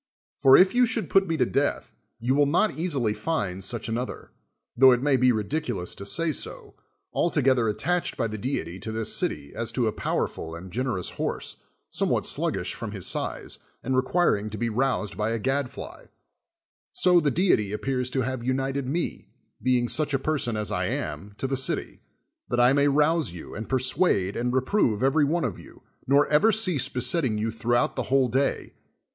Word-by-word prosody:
For, 135 -1 +7
if 185 +3 +5
you 245 0 +4
should 225 -1 -2
put 195 0 +4
me 165 -1 -1
to - - +3
death, 140 +1 -1 0.3
you 125 +3 0
will 145 +1 +3
not 190 +9 +2
easily 145 -10 -1
find 105 - -2
such 115 +3 -2
another, 120 +3 -4 0.4
tho 130 +2 +7
it 120 - 0
may 145 -2 +3
be 130 0 +4
ridiculous 115 - -2
to 100 - -8
say 165 +7 +1
so, - - -6 0.4
altogether 130 -8 +2
attached 175 +11 -1
by - - 0
the 110 -1 -4
deity 95 - -3
to 110 - -4
this 110 0 -1
city 70 -1 -2
as 115 - -3
to 125 - 0
a 110 - +1
powerful 80 -5 -3
and 90 +2 -10
generous 120 -5 -2
horse, - - -4 0.3
some - - 0
what - - 0
sluggish - - 0
from - - -6
his - - -3
size, - - -2 0.2
and 130 +1 -1
requiring 130 -6 +1
to 110 - -6
be 115 +1 -1
roused 125 -3 -1
by 105 +1 0
a 115 - -1
gad 135 +3 -1
fly; - - -10 0.8
so 180 -1 +4
the 150 -3 +1
deity 140 - +2
appears 125 +3 -2
to 130 +1 -1
have 130 -1 -3
united 135 +1 -1
me, 165 +6 -3 0.3
being 125 -1 +2
such 145 +2 +1
a - - +3
person 135 -5 -1
as 105 -1 -3
I - - -1
am, 80 +7 -4
to - - -3
the 135 0 0
city, 135 +1 -2 0.5
that 120 - 0
I 125 +2 +5
may 145 0 +3
rouse 150 - +2
you, 85 - -9
and 110 +1 -7
persuade 130 - +1
and 125 +1 -1
re 130 +1 +2
prove 130 - +1
every 145 +3 +3
one 165 +4 0
of 105 -8 -4
you, - - -15 0.2
nor 140 +2 +4
ever 150 +10 +4
cease 185 - +2
besettiiig 125 -2 0
you 110 +1 -1
throughout 120 +2 0
the - - -1
whole 135 -1 +3
day. 135 +4 -1
130 Hz, 195 wpm, -26 LUFS, 110-145 Hz, 0.8 s, For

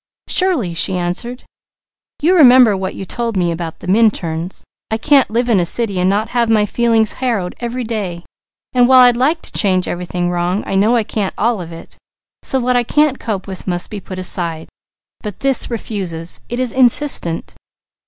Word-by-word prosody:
"Surely!" 330 - +1
she 185 +2 -1
answered. 180 +8 -3 0.8
"You 345 +4 +4
remember 250 - +6
what 190 0 -4
you 195 - -6
told 230 +1 -3
me 175 -2 +1
about 165 -1 -6
the - - -9
Minturns. 185 -5 0 0.3
I 220 - -1
can't 275 +3 +3
live 235 +3 0
in 225 -5 +3
a - - +2
city 200 +1 -2
and 180 +1 +2
not 210 +3 0
have 235 -1 0
my 215 -2 +3
feelings 225 0 +1
harrowed 225 -8 -1
every 245 +1 -4
day, 200 -7 -4 0.5
and 245 -1 +4
while 260 0 +7
I'd 245 -1 +6
like 295 +7 0
to - - -12
change 185 -3 +1
everything 175 0 -3
wrong, 175 +3 -1
I - - -4
know 210 +5 +3
I 230 - +2
can't 205 -2 -3
all 225 -2 0
of 170 -1 -9
it, 165 - -12 0.4
so 265 - -1
what 250 0 0
I 245 - +4
can't 295 +2 +1
cope 205 -5 -4
with 190 -1 -8
must 175 -1 -2
be 210 - -5
put 185 -1 -9
aside; 170 -3 -2 0.5
but 210 -4 -7
this 270 -2 +1
refuses, 185 -8 -4
it 240 - -4
is 255 -2 0
insistent. 250 - +2
215 Hz, 190 wpm, -16 LUFS, 180-245 Hz, 0.8 s, while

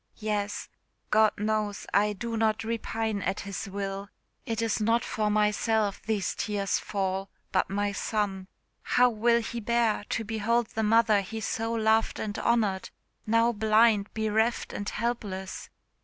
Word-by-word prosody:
"Yes; 210 -1 -2 0.4
God 215 0 +5
knows 210 -1 -1
I 210 +1 +3
do 230 +3 -4
not 220 -1 +1
repine 225 -2 -2
at 190 +1 -2
His 200 +1 -5
will. 195 0 -4 0.4
It 225 -1 -2
is 225 -1 0
not 230 +3 +2
for 215 -1 -1
myself 210 0 +1
these 215 -4 -1
tears 200 -2 -1
fall, 195 -1 -2 0.2
but 185 - +1
my 205 +1 0
son. 200 -2 -2 0.3
How 250 0 +3
will 235 +2 +3
he 235 - -4
bear 230 -2 +1
to 225 - -1
behold 225 +2 0
the 220 - -2
mother 220 -1 +4
he 220 +4 -6
so 225 +1 -2
loved 220 0 +2
and 205 -1 -3
honoured, 215 -5 +1 0.4
now 230 +2 +4
blind, 215 -1 +3
bereft, 220 +2 0
and 205 - -3
helpless?" 210 -5 -4
215 Hz, 145 wpm, -28 LUFS, 205-225 Hz, 0.4 s, God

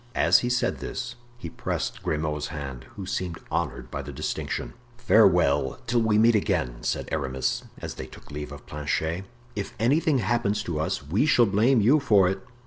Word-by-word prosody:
As - - +5
he 120 - -1
said 125 0 0
this, - - -5 0.2
he 85 - -7
pressed - - -3
Grimaud's 75 -1 -1
hand, 70 -5 -6
who 100 - -6
seemed 90 -2 -3
honored - - -2
by - - -3
the - - -7
distinction. - - -3 0.2
"Farewell 90 - +4
till 120 0 +2
we 110 -2 +3
meet 115 +2 +6
again," 80 - 0
said - - -2
Aramis, 65 -4 -1
as - - -6
they 65 - -7
took 65 - -14
leave 75 0 -6
of 70 -1 -10
Planchet; 80 +4 -2 0.3
"if 100 -1 -4
anything 140 +5 +3
happens 105 -2 0
to 80 -3 -3
us 75 - -1
we 100 - +1
shall 120 -5 +5
blame 110 +5 +3
you 130 +9 +5
for 105 -9 +4
it." 95 +1 -1
95 Hz, 180 wpm, -26 LUFS, 75-115 Hz, 0.3 s, meet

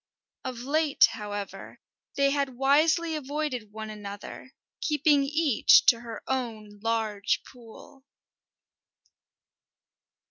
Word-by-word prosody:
Of 250 -2 -5
late, 290 +2 +3
however, 205 -1 -7 0.4
they 275 0 +3
had 275 -3 -2
wisely 315 +5 +3
avoided 285 -6 -4
one 220 0 -7
another, 205 +4 -9 0.3
keeping 295 -2 +2
each 295 -4 +4
to 230 - +5
her 230 -1 -8
own 220 -5 -4
large 220 -2 -1
pool. 245 +2 -15
255 Hz, 95 wpm, -27 LUFS, 220-285 Hz, 0.4 s, to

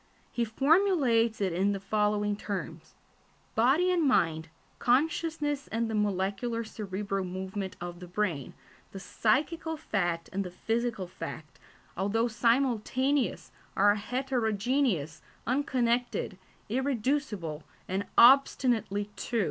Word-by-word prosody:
He 240 - 0
formulates 270 - +3
it 190 -3 0
in 195 +4 +1
the 195 - -3
following 210 +1 0
terms: 170 -6 -6 0.6
"body 275 +11 +3
and 355 -2 +2
mind, 165 - +2 0.3
consciousness 295 +2 0
and 225 0 -2
the - - -3
molecular 210 +3 -1
cerebral 200 -2 -4
movement 190 +1 -5
of 175 0 -6
the 180 - -9
brain, 175 -7 -2 0.4
the 195 - -6
psychical 310 - 0
fact 175 - -1
and 195 +1 -1
the 180 - -6
physical 225 +2 -2
fact, 165 -3 -8 0.4
although 210 +5 +1
simultaneous, 255 +3 +1 0.2
are 205 +1 +5
heterogeneous, 220 - -1 0.2
unconnected, 245 -6 0 0.3
irreducible, 240 - -1 0.3
and 195 +2 -2
obstinately 235 -5 +4
two." 235 +2 -2
220 Hz, 110 wpm, -29 LUFS, 190-255 Hz, 0.6 s, are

